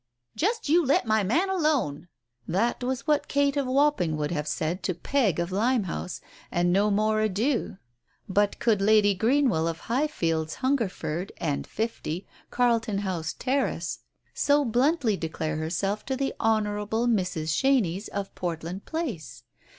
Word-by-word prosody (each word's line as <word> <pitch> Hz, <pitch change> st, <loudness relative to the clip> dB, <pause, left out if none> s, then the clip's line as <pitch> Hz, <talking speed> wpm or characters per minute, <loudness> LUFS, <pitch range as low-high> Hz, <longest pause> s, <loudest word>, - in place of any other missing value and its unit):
"Just 450 Hz, +4 st, 0 dB
you 335 Hz, +4 st, +4 dB
let 275 Hz, -2 st, +2 dB
my 220 Hz, -1 st, +2 dB
man 255 Hz, -, +1 dB
alone! 290 Hz, -, 0 dB, 0.2 s
" 120 Hz, 0 st, -56 dB
That 230 Hz, +7 st, 0 dB
was 255 Hz, +1 st, -2 dB
what 300 Hz, -1 st, +1 dB
Kate 285 Hz, 0 st, +2 dB
of 280 Hz, -2 st, 0 dB
Wapping 260 Hz, -, +2 dB
would 150 Hz, +1 st, -2 dB
have 150 Hz, -3 st, -2 dB
said 170 Hz, +5 st, -2 dB
to 185 Hz, -1 st, -1 dB
Peg 205 Hz, -, +1 dB
of 170 Hz, +1 st, -2 dB
Limehouse, 205 Hz, -4 st, -1 dB, 0.3 s
and 175 Hz, 0 st, +1 dB
no 205 Hz, +2 st, +3 dB
more 215 Hz, +1 st, +2 dB
ado, 215 Hz, +1 st, 0 dB, 0.5 s
but 205 Hz, +1 st, +1 dB
could 215 Hz, -4 st, +2 dB
Lady 205 Hz, 0 st, +5 dB
Greenwell 230 Hz, -, +2 dB
of 165 Hz, 0 st, -4 dB
Highfields, 170 Hz, -, -1 dB
Hungerford, 200 Hz, -, -1 dB
and 145 Hz, -4 st, -2 dB
50, 200 Hz, -5 st, -3 dB, 0.2 s
Carlton 230 Hz, -4 st, +1 dB
House 180 Hz, -6 st, -2 dB
Terrace 270 Hz, +2 st, -1 dB, 0.3 s
so 290 Hz, 0 st, +3 dB
bluntly 245 Hz, -, +2 dB
declare 160 Hz, -2 st, -3 dB
herself 195 Hz, +6 st, -2 dB
to 265 Hz, -, 0 dB
the 275 Hz, +1 st, -1 dB
Honour 215 Hz, -2 st, +1 dB
able 220 Hz, +3 st, -1 dB
Mrs. 180 Hz, -8 st, 0 dB
Chenies 220 Hz, -8 st, +1 dB
of 200 Hz, -1 st, -4 dB
Portland 175 Hz, +2 st, -4 dB
Place? 165 Hz, -, -5 dB
210 Hz, 150 wpm, -26 LUFS, 175-260 Hz, 0.5 s, Lady